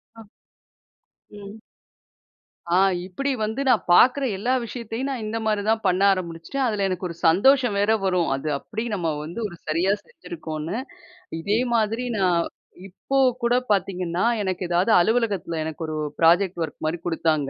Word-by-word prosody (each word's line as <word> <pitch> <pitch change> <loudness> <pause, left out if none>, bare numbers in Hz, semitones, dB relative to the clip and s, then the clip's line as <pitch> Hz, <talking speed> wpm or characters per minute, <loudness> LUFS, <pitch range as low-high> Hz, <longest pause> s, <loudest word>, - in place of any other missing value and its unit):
அ. 225 - -11 1.2
ம். 205 +1 -10 1.2
ஆ - - +5 0.3
இப்பிடி 275 +10 -3
வந்து 220 +5 -3
நான் 245 -4 +3
பார்க்குற 260 +9 +5
எல்லா 245 +6 0
விஷயத்தையும் 235 +3 -5
நான் 250 -5 -4
இந்தமாரி 215 -1 -1
தான் 220 0 +2
பண்ண 185 +1 +1
ஆரம்முச்சுட்டேன். 185 +8 -3
அதில 205 -3 0
எனக்கு 185 0 -3
ஒரு 170 - -7
சந்தோஷம் 245 +5 +4
வேற 205 +2 +2
வரும். 180 -3 +1
அது 140 +3 -6
அப்பிடி 220 +8 -5
நம்ம 170 -4 -1
வந்து 170 +9 -7
ஒரு 175 - -12
சரியா 170 +5 +1
செஞ்சிருக்கோன்னு. 165 +2 -6 0.6
இதேமாதிரி 225 +3 0
நான் 180 -3 +3 0.5
இப்ப 200 +8 -3 0.3
கூட 240 +1 +3 0.2
பார்த்தீங்கன்னா, 180 -3 0 0.2
எனக்கு 185 -1 -2
ஏதாவது 180 +5 +2
அலுவலகத்தில 205 -6 0
எனக்கு 160 +1 -6
ஒரு 155 0 -4 0.2
புராஜெக்ட் 175 +2 +3
ஒர்க்மாரி 155 +2 -3
குடுத்தாங்க. 160 -4 0
195 Hz, 135 wpm, -23 LUFS, 170-225 Hz, 1.2 s, ஆ